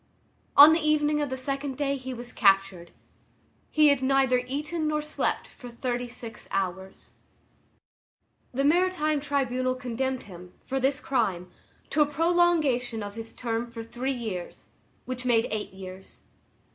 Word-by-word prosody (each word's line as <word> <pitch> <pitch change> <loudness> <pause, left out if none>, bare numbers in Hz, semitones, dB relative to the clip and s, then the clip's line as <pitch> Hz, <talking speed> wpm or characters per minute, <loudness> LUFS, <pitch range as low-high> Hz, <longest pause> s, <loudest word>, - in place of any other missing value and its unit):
On 295 +2 +11
the 325 - +2
evening 300 -1 +2
of 290 - -1
the 260 - -3
second 275 0 -2
day 280 -1 0
he 260 -1 -6
was 245 0 -7
captured. 195 -4 +2 0.8
He 305 -1 +5
had 280 -2 +2
neither 265 -1 +3
eaten 305 +4 -2
nor 305 0 0
slept 300 - -2
for 245 - -12
thirty 245 +1 -3
six 230 -2 -9
hours. 190 0 -4 1.4
The 270 +2 -1
maritime 310 -1 +2
tribunal 255 -3 -1
condemned 255 +1 -3
him, 180 -2 -12
for 270 0 -2
this 270 +2 +1
crime, 195 -11 -1 0.4
to 300 - +2
a 295 - +5
prolongation 300 -7 +2
of 205 0 -6
his 225 +1 -5
term 235 0 -3
for 230 -1 -7
three 245 +4 -3
years, 220 -9 -6 0.4
which 255 0 -4
made 235 -2 +3
eight 215 -1 -3
years. 190 0 -10
255 Hz, 145 wpm, -27 LUFS, 225-290 Hz, 1.4 s, On